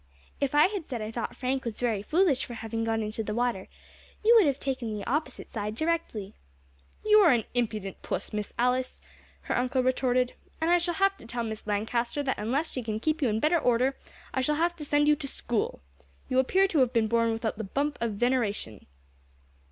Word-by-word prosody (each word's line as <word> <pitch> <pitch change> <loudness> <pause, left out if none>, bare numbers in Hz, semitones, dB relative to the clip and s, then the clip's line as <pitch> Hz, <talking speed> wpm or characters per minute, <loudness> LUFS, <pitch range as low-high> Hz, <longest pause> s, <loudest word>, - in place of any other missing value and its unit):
If 280 0 0
I 295 - +7
had 385 -4 -3
said 245 -4 -4
I 215 0 -4
thought 235 0 -4
Frank 260 +1 -1
was 230 -3 -5
very 230 -5 0
foolish 310 - +2
for 240 - -7
having 225 0 -3
gone 225 -1 0
into 215 +1 -3
the 210 0 -3
water, 240 -5 -1 0.6
you 460 - +7
would 425 -8 +7
have 275 -2 +1
taken 255 -6 -3
the 205 - -6
opposite 275 0 -3
side 210 -1 -3
directly." 315 -10 -2 0.7
"You 425 0 +7
are 360 -7 +7
an 235 -3 +3
impudent 215 -5 -2
puss, 195 +4 -4
Miss 210 -1 -3
Alice," 250 +1 0 0.4
her - - -2
uncle 255 +1 +1
retorted, 255 -1 +1 0.3
"and 325 +2 +1
I 350 - +5
shall 345 0 -1
have 390 0 +2
to - - -13
tell 235 0 -3
Miss 220 -1 -5
Lancaster 235 +6 -1
that 265 - -1
unless 265 +10 -1
she 255 - -3
can 220 -2 -3
keep 310 +6 0
you 260 - +3
in 215 0 0
better 320 +6 +3
order 250 +1 +2 0.4
I 260 - +1
shall 300 +4 +1
have 340 +3 +1
to 300 - -6
send 290 +1 +2
you 300 - +6
to 275 - -4
school. 230 - -2 0.4
You 255 - +2
appear 380 +9 +3
to 320 - +1
have 255 -2 +3
been 225 -2 +3
born 230 0 +2
without 225 -1 -3
the - - -2
bump 280 +8 -2
of 230 -2 0
veneration." 210 - -1
250 Hz, 215 wpm, -28 LUFS, 225-295 Hz, 0.7 s, I